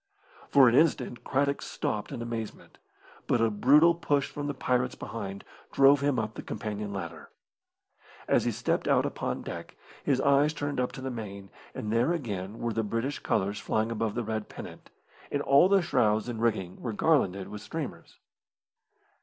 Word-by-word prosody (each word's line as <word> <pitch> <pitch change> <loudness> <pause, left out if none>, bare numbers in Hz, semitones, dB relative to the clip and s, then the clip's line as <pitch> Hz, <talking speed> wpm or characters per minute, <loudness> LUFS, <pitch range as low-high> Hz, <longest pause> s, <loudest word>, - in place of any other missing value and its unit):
For 135 -2 +7
an 120 - +4
instant 130 -4 +2
Craddock 140 +1 0
stopped 105 +5 -3
in 120 -4 -4
amazement, 115 -2 -6 0.5
but 120 - +2
a 115 -1 +3
brutal 145 +10 +5
push 145 -4 0
from 145 -1 -5
the 145 - -3
pirates 125 -1 0
behind 100 -3 -6 0.3
drove 140 +1 +6
him 140 -2 +1
up 110 -1 -2
the - - -7
companion 105 -1 -5
ladder. 85 -5 -6 1.0
As - - +3
he - - +2
stepped - - -1
out - - +3
upon - - -3
deck, - - -7 0.3
his 135 -3 +2
eyes 140 +2 +4
turned 145 -2 -2
up 125 - 0
to 135 - -8
the 130 0 -3
main, 100 -5 -7 0.2
and 105 +1 -3
there 120 +8 +3
again 105 - -4
were 120 -1 -2
the 115 - 0
British 115 +6 -2
colours 100 +1 0
flying 110 +1 -1
above 115 -2 -2
the 120 - -1
red 110 -1 -3
pennant, - - -10 0.4
and 145 0 0
all 140 +7 +5
the 195 -2 +4
shrouds 110 -8 +2
and 115 -2 -4
rigging 105 -6 -1
were 115 - -3
garlanded 100 - +2
with 105 - -7
streamers. 140 +8 -6
120 Hz, 175 wpm, -28 LUFS, 105-140 Hz, 1.0 s, For